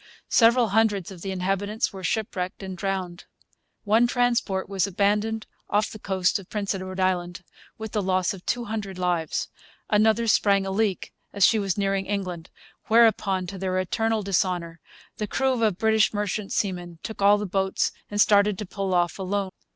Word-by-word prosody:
Several 235 Hz, 0 st, +5 dB
hundreds 205 Hz, -3 st, +1 dB
of 180 Hz, -3 st, -11 dB
the 195 Hz, -, -5 dB
inhabitants 195 Hz, +4 st, -1 dB
were 190 Hz, -1 st, -8 dB
shipwrecked 185 Hz, -1 st, -2 dB
and 190 Hz, -1 st, -5 dB
drowned. 185 Hz, -1 st, -4 dB, 0.6 s
One 225 Hz, +3 st, +4 dB
transport 240 Hz, -6 st, 0 dB
was 195 Hz, -1 st, 0 dB
abandoned 210 Hz, +3 st, 0 dB, 0.2 s
off 210 Hz, +1 st, +1 dB
the 215 Hz, -, -9 dB
coast 190 Hz, 0 st, 0 dB
of 190 Hz, -, -14 dB
Prince 205 Hz, -3 st, -2 dB
Edward 185 Hz, 0 st, -6 dB
Island, 180 Hz, -1 st, -1 dB, 0.3 s
with 220 Hz, -1 st, -6 dB
the 210 Hz, -, 0 dB
loss 185 Hz, -1 st, +1 dB
of 185 Hz, -2 st, -11 dB
two 240 Hz, 0 st, -1 dB
hundred 210 Hz, -4 st, -5 dB
lives. 175 Hz, -3 st, -1 dB, 0.4 s
Another 220 Hz, +2 st, +3 dB
sprang 200 Hz, -3 st, +3 dB
a 195 Hz, -, -3 dB
leak 205 Hz, -1 st, -1 dB, 0.2 s
as 200 Hz, -2 st, +4 dB
she 220 Hz, -, +4 dB
was 195 Hz, -2 st, -1 dB
nearing 195 Hz, -1 st, 0 dB
England; 185 Hz, -4 st, -4 dB, 0.4 s
whereupon, 220 Hz, -5 st, +3 dB
to 190 Hz, +2 st, -7 dB
their 185 Hz, 0 st, -1 dB
eternal 225 Hz, +4 st, 0 dB
dishonour, 180 Hz, -3 st, -1 dB, 0.4 s
the 210 Hz, -, -3 dB
crew 260 Hz, 0 st, 0 dB
of 210 Hz, -5 st, +2 dB
British 220 Hz, 0 st, +2 dB
merchant 205 Hz, 0 st, -2 dB
seamen 175 Hz, -4 st, -2 dB
took 220 Hz, -, -7 dB
all 200 Hz, +1 st, +6 dB
the 210 Hz, -, -3 dB
boats 190 Hz, 0 st, 0 dB, 0.2 s
and 205 Hz, -, -4 dB
started 205 Hz, -1 st, +4 dB
to 210 Hz, -, -5 dB
pull 195 Hz, 0 st, -2 dB
off 175 Hz, +1 st, +1 dB
alone. 195 Hz, 0 st, -2 dB
195 Hz, 175 wpm, -25 LUFS, 185-215 Hz, 0.6 s, all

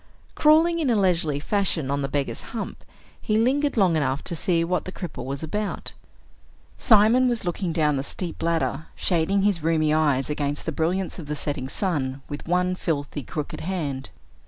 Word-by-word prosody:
Crawling 325 Hz, +3 st, +4 dB
in 300 Hz, -5 st, +1 dB
a 235 Hz, -, +3 dB
leisurely 170 Hz, -7 st, +1 dB
fashion 165 Hz, -5 st, 0 dB
on 140 Hz, 0 st, 0 dB
the 135 Hz, -, -1 dB
beggar's 140 Hz, 0 st, -2 dB, 0.2 s
hump, -, -, -5 dB, 0.4 s
he 215 Hz, -, +1 dB
lingered 275 Hz, +5 st, +2 dB
long 185 Hz, -5 st, +4 dB
enough 140 Hz, -2 st, 0 dB
to 170 Hz, -, -3 dB
see 165 Hz, +1 st, +1 dB
what 180 Hz, +2 st, -1 dB
the 185 Hz, -, -5 dB
cripple 180 Hz, -8 st, -6 dB
was 135 Hz, +3 st, -4 dB
about. 205 Hz, +6 st, -3 dB, 0.8 s
Simon 230 Hz, +3 st, +5 dB
was 235 Hz, -5 st, -2 dB
looking 175 Hz, 0 st, -1 dB
down 150 Hz, -3 st, +2 dB
the -, -, 0 dB
steep 170 Hz, +5 st, -5 dB
ladder, 160 Hz, -3 st, 0 dB
shading 190 Hz, +3 st, +1 dB
his 200 Hz, -4 st, +3 dB
rheumy 155 Hz, -1 st, +2 dB
eyes 145 Hz, -4 st, +2 dB
against 145 Hz, -1 st, -2 dB
the 160 Hz, -, -1 dB
brilliance 175 Hz, +5 st, -1 dB
of 155 Hz, -, -8 dB
the 150 Hz, -, -2 dB
setting 140 Hz, -3 st, -3 dB
sun 135 Hz, -7 st, -2 dB
with 145 Hz, +2 st, -7 dB
one 180 Hz, +1 st, +2 dB
filthy, 145 Hz, -5 st, -2 dB
crooked 145 Hz, +3 st, -5 dB
hand. 150 Hz, -7 st, -3 dB
165 Hz, 180 wpm, -24 LUFS, 145-195 Hz, 0.8 s, Simon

